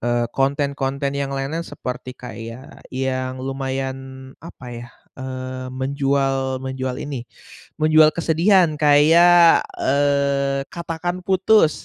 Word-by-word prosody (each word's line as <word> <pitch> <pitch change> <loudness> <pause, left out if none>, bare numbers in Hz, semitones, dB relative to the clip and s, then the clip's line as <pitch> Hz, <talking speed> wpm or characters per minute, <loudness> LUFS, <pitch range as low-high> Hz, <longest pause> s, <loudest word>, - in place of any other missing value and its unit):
eee, 120 0 0
konten-konten 140 0 -1
yang 140 -1 -2
lain-lain 140 +5 -3
seperti 130 -2 -7
kayak 115 +1 -10
yang 130 0 -3
lumayan, 135 0 -5
apa 160 -5 -12
ya, 120 0 -8 0.3
eee, 130 0 -6
menjual 135 0 -1
menjual 130 -1 -3
ini, 130 -4 -6 0.5
menjual 155 0 +6
kesedihan 170 +1 +3
kayak, 165 +4 +6 0.2
eee, 140 0 +1
Katakan 170 +1 -4
Putus 190 -3 +3
135 Hz, 100 wpm, -21 LUFS, 130-155 Hz, 0.5 s, menjual